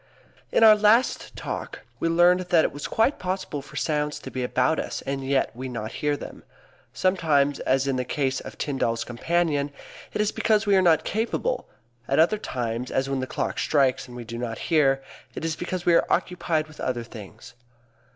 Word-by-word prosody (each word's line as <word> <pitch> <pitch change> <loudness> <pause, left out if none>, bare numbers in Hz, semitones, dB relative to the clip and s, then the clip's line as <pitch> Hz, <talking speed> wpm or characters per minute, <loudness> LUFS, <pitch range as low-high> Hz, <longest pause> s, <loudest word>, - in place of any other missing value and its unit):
_ - - -34 0.5
In - - +4
our 215 -1 +9
last 215 +4 +2
Talk - - -5 0.2
we 165 - +1
learned 175 +2 +5
that 170 -3 +5
it - - -1
was 145 +1 -6
quite 225 +6 +1
possible 185 -5 -3
for 135 - -15
sounds 150 -1 -1
to - - -8
be 130 - -3
about 125 +5 +1
us - - -4
and 135 0 -3
yet 135 -2 0
we 130 +2 -5
not 115 -2 -5
hear 145 -1 +1
them. - - -10 0.5
Sometimes, 150 -7 +2
as 135 +1 +1
in 135 -2 0
the 125 - 0
case 135 0 -1
of - - -10
Tyndall's 115 -5 -1
companion, 145 +3 0 0.4
it - - -4
is 210 0 +2
because 215 -1 +2
we 200 -1 +4
are 190 - +5
not 170 -4 +4
capable; 235 - -2 0.4
at 135 - +1
other 170 +7 +4
times, 120 - -3
as 135 +1 -1
when 135 - 0
the 130 - -3
clock - - -3
strikes 135 -4 +2
and 125 0 -10
we 120 - -6
do 115 +1 -7
not 115 -2 -4 0.2
hear, 135 -3 +3 0.3
it - - -4
is 160 -1 -1
because 175 +1 -4
we 175 - +5
are - - +4
occupied 170 -3 0
with 155 - -16
other 120 -2 -2
things. 110 0 -11
145 Hz, 200 wpm, -25 LUFS, 130-175 Hz, 0.5 s, our